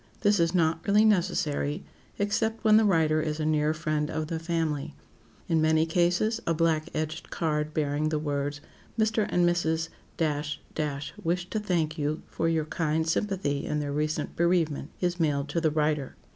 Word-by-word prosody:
This 205 Hz, -1 st, +3 dB
is 170 Hz, +1 st, +2 dB
not 165 Hz, -2 st, +2 dB
really 210 Hz, +2 st, +5 dB
necessary, 170 Hz, -7 st, +1 dB, 0.3 s
except 220 Hz, +2 st, 0 dB
when 215 Hz, -1 st, +6 dB
the 220 Hz, -, +4 dB
writer 160 Hz, -5 st, +3 dB
is 155 Hz, 0 st, -2 dB
a 155 Hz, -, -1 dB
near 155 Hz, 0 st, +2 dB
friend 155 Hz, -1 st, -1 dB
of 155 Hz, 0 st, -3 dB
the 165 Hz, -2 st, -2 dB
family. 165 Hz, -4 st, -2 dB, 0.5 s
In 160 Hz, -1 st, +2 dB
many 160 Hz, 0 st, +3 dB
cases, 175 Hz, +7 st, +1 dB
a 165 Hz, -, +2 dB
black 160 Hz, -1 st, +1 dB
edged 155 Hz, +1 st, -3 dB
card 150 Hz, -2 st, -1 dB
bearing 150 Hz, 0 st, 0 dB
the 155 Hz, -, 0 dB
words, 145 Hz, -1 st, -2 dB, 0.4 s
"Mr. 220 Hz, -1 st, +2 dB
and 175 Hz, 0 st, +3 dB
Mrs. 160 Hz, -2 st, 0 dB, 1.3 s
—— -, -, -13 dB
wish 175 Hz, +2 st, -1 dB
to 215 Hz, -, 0 dB
thank 165 Hz, -6 st, -1 dB
you 150 Hz, +1 st, -1 dB
for 165 Hz, -, -1 dB
your 160 Hz, -2 st, +1 dB
kind 160 Hz, 0 st, -1 dB
sympathy 165 Hz, -5 st, 0 dB
in 150 Hz, -, -1 dB
their 145 Hz, -1 st, -3 dB
recent 155 Hz, +1 st, -2 dB
bereavement," 165 Hz, -4 st, +1 dB
is 175 Hz, 0 st, 0 dB
mailed 145 Hz, -3 st, +1 dB
to 165 Hz, +3 st, -1 dB
the 160 Hz, -, +3 dB
writer. 150 Hz, -2 st, 0 dB
160 Hz, 170 wpm, -28 LUFS, 150-175 Hz, 1.3 s, when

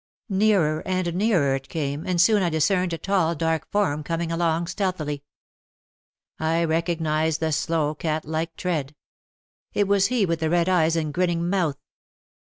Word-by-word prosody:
Nearer 190 Hz, -6 st, +2 dB
and 185 Hz, -2 st, -1 dB
nearer 180 Hz, -8 st, +2 dB
it 135 Hz, 0 st, -4 dB
came 145 Hz, -1 st, -3 dB
and 180 Hz, -2 st, 0 dB
soon 205 Hz, +3 st, +5 dB
I 175 Hz, -, +1 dB
discerned 175 Hz, +3 st, +1 dB
a 165 Hz, -, -2 dB
tall, 180 Hz, -3 st, +1 dB
dark 160 Hz, -1 st, -1 dB
form 190 Hz, -8 st, +1 dB
coming 165 Hz, +2 st, -3 dB
along 165 Hz, 0 st, 0 dB
stealthily. 165 Hz, -6 st, -3 dB, 1.2 s
I 165 Hz, +1 st, +1 dB
recognised 160 Hz, -1 st, 0 dB
the 160 Hz, -1 st, 0 dB
slow 155 Hz, 0 st, 0 dB
cat 155 Hz, 0 st, -2 dB
like 160 Hz, +2 st, -3 dB
tread. 150 Hz, -6 st, -3 dB, 0.8 s
It 205 Hz, -1 st, +1 dB
was 200 Hz, -1 st, +3 dB
he 235 Hz, -3 st, +1 dB
with 165 Hz, -2 st, -1 dB
the 160 Hz, -1 st, 0 dB
red 170 Hz, +1 st, +2 dB
eyes 165 Hz, -3 st, +3 dB
and 155 Hz, -2 st, -1 dB
grinning 175 Hz, -1 st, 0 dB
mouth. 175 Hz, -7 st, 0 dB
165 Hz, 155 wpm, -24 LUFS, 155-185 Hz, 1.2 s, soon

